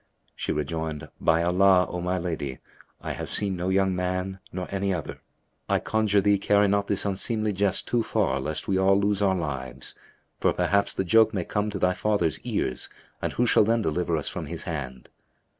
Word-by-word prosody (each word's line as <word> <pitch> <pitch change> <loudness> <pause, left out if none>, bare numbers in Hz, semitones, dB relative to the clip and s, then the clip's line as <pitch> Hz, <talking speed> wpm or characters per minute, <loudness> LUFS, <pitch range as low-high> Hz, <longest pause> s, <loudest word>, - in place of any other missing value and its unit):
She - - -3
rejoined 80 0 -3
"By 80 +1 +3
Allah, 90 +1 +4
O 90 - -4
my 90 +1 -1
lady, 80 -7 -3 0.4
I - - -4
have - - -5
seen 100 -2 -1
no 90 +1 -2
young 95 0 +2
man 90 +1 -2
nor 90 0 -4
any 100 0 0
other. 85 -4 -4 0.5
I - - +3
conjure 105 -2 +2
thee, 100 0 +3
carry 100 +1 +3
not 100 0 +1
this 100 - 0
unseemly 110 +2 0
jest 100 0 +1
too 120 - +1
far 70 -10 0
lest 75 +3 -4
we 95 -1 +1
all 95 +1 +4
lose 100 0 +1
our 95 -2 +3
lives; 65 -6 -5 0.5
for - - +2
perhaps 100 0 +1
the - - 0
joke 110 +4 +4
may 90 -3 -1
come 105 +1 -1
to 100 - -4
thy 90 -1 +2
father's 100 -7 0
ears 65 - -2 0.3
and - - -2
who 120 - +1
shall 115 - +5
then 115 +1 +1
deliver 85 0 0
us 75 - -3
from - - -3
his 85 +1 -5
hand?" 65 -7 -5
95 Hz, 195 wpm, -26 LUFS, 80-100 Hz, 0.5 s, shall